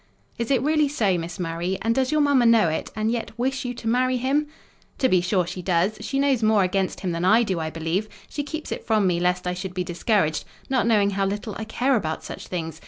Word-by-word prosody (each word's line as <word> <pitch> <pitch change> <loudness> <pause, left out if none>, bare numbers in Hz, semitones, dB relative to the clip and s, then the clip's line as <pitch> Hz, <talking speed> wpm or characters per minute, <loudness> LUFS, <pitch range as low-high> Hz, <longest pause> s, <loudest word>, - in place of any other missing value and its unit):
"Is 235 - -2
it 265 -3 +2
really 305 0 +3
so, 215 -10 +1
Miss 165 +1 -6
Murray? 175 +2 -2
and 225 +1 +2
does 260 +2 +1
your 305 0 +3
mamma 280 -4 +4
know 225 -7 +5
it, 160 - -3
and 215 +1 0
yet 230 -1 -4
wish 265 +2 -1
you 245 0 -3
to 230 - -7
marry 255 +2 +2
him?" 275 +4 +1 0.5
"To 260 - +3
be 185 -6 +3
sure, 180 0 +1
she 180 - -6
does! 180 +4 +1
She 270 +5 -3
knows 275 -3 +2
more 215 -2 +4
against 185 +1 -1
him 185 - -1
than 170 +1 -2
I 220 +6 +5
do, 190 -6 -1
I 160 0 -2
believe: 165 +6 -2 0.2
she 290 - -4
keeps 310 +2 -6
it - - -4
from 215 -3 +2
me 175 -2 +2
lest 180 +1 0
I 180 - 0
should 180 0 -6
be 180 - -1
discouraged; 175 -3 0 0.3
not 260 -3 +2
knowing 205 -3 +3
how 195 0 0
little 205 +2 -4
I 220 - -5
care 255 +4 +1
about 160 -8 -2
such - - -8
things. 165 -3 -5
215 Hz, 245 wpm, -24 LUFS, 180-250 Hz, 0.5 s, know